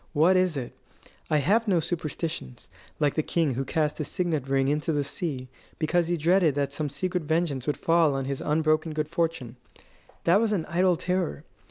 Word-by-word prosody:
What 165 Hz, +5 st, +4 dB
is 185 Hz, -4 st, +2 dB
it? 125 Hz, -3 st, -5 dB, 0.5 s
I 155 Hz, -, +3 dB
have 210 Hz, -, +2 dB
no 185 Hz, -4 st, +3 dB
superstitions, 155 Hz, -, -4 dB, 0.3 s
like 145 Hz, -2 st, +2 dB
the 155 Hz, -, +1 dB
king 155 Hz, -3 st, 0 dB
who 130 Hz, +3 st, -2 dB
cast 150 Hz, +2 st, -1 dB
his 150 Hz, -, -2 dB
signet 165 Hz, -8 st, -1 dB
ring 135 Hz, 0 st, +2 dB
into 150 Hz, +3 st, 0 dB
the 145 Hz, -2 st, 0 dB
sea 140 Hz, -2 st, -3 dB, 0.3 s
because 170 Hz, +1 st, +1 dB
he 175 Hz, 0 st, 0 dB
dreaded 165 Hz, -1 st, +3 dB
that 140 Hz, -1 st, -1 dB
some 150 Hz, 0 st, -2 dB
secret 180 Hz, +5 st, -2 dB
vengeance 155 Hz, -4 st, -1 dB
would 150 Hz, -, 0 dB
fall 165 Hz, -4 st, +3 dB
on 135 Hz, -1 st, -2 dB
his 135 Hz, 0 st, -3 dB
unbroken 155 Hz, +1 st, +1 dB
good 155 Hz, -1 st, -2 dB
fortune. 165 Hz, -8 st, -2 dB, 0.7 s
That 180 Hz, +5 st, +4 dB
was 225 Hz, -2 st, +1 dB
an 170 Hz, -6 st, -1 dB
idle 180 Hz, +1 st, +2 dB
terror. 180 Hz, -3 st, -2 dB
155 Hz, 190 wpm, -26 LUFS, 145-175 Hz, 0.7 s, What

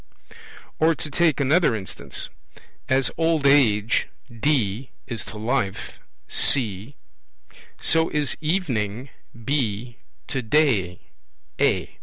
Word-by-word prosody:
Or 160 Hz, +1 st, +3 dB
to 150 Hz, +1 st, -6 dB
take 165 Hz, -2 st, +2 dB
another 145 Hz, -1 st, +2 dB
instance: 95 Hz, -3 st, -4 dB, 0.6 s
As 130 Hz, -1 st, +2 dB
old 165 Hz, -3 st, +1 dB
age 115 Hz, -6 st, +3 dB, 0.3 s
(D) 125 Hz, -3 st, 0 dB, 0.2 s
is 115 Hz, -3 st, -5 dB
to 105 Hz, -, -9 dB
life 110 Hz, -2 st, -3 dB, 0.3 s
(C), 115 Hz, 0 st, +3 dB, 0.8 s
so 165 Hz, 0 st, +3 dB
is 150 Hz, -2 st, 0 dB
evening 135 Hz, -, -2 dB, 0.3 s
(B) 120 Hz, -4 st, -2 dB, 0.3 s
to 135 Hz, -, -3 dB
day 110 Hz, -, +1 dB, 0.6 s
(A). -, -, 0 dB
130 Hz, 100 wpm, -23 LUFS, 110-150 Hz, 0.8 s, Or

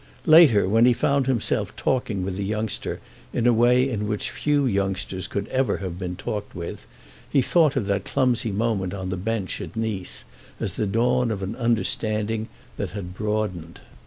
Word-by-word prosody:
Later, 150 Hz, -, +7 dB
when 115 Hz, +4 st, +5 dB
he 125 Hz, -, +6 dB
found 140 Hz, +2 st, +1 dB
himself 125 Hz, -4 st, 0 dB
talking 110 Hz, -7 st, -1 dB
with 95 Hz, -1 st, -3 dB
the 100 Hz, -, -3 dB
youngster 110 Hz, +1 st, -2 dB, 0.3 s
in 120 Hz, -, 0 dB
a 120 Hz, -, +6 dB
way 125 Hz, +3 st, +4 dB
in 105 Hz, -5 st, -2 dB
which 105 Hz, -1 st, -2 dB
few 145 Hz, -1 st, +1 dB
youngsters 95 Hz, -4 st, -1 dB
could 100 Hz, +1 st, -3 dB
ever 130 Hz, -5 st, +1 dB
have 90 Hz, -2 st, -5 dB
been 90 Hz, -1 st, -4 dB
talked 105 Hz, +2 st, -5 dB
with, 85 Hz, -1 st, -6 dB, 0.4 s
he 135 Hz, -3 st, +3 dB
thought 160 Hz, 0 st, +3 dB
of 125 Hz, -6 st, 0 dB
that 100 Hz, -1 st, 0 dB
clumsy 125 Hz, -4 st, +1 dB
moment 100 Hz, -3 st, -1 dB
on 95 Hz, -1 st, -4 dB
the 95 Hz, -, -1 dB
bench 100 Hz, +1 st, -2 dB
at -, -, -8 dB
Nice 110 Hz, -5 st, -3 dB, 0.4 s
as -, -, -2 dB
the 105 Hz, -, -1 dB
dawn 120 Hz, +4 st, +2 dB
of 100 Hz, -3 st, -3 dB
an 95 Hz, +4 st, -4 dB
understanding 110 Hz, -2 st, 0 dB, 0.3 s
that -, -, -2 dB
had 90 Hz, -2 st, -6 dB
broadened. 105 Hz, -5 st, -3 dB
110 Hz, 180 wpm, -24 LUFS, 95-120 Hz, 0.4 s, Later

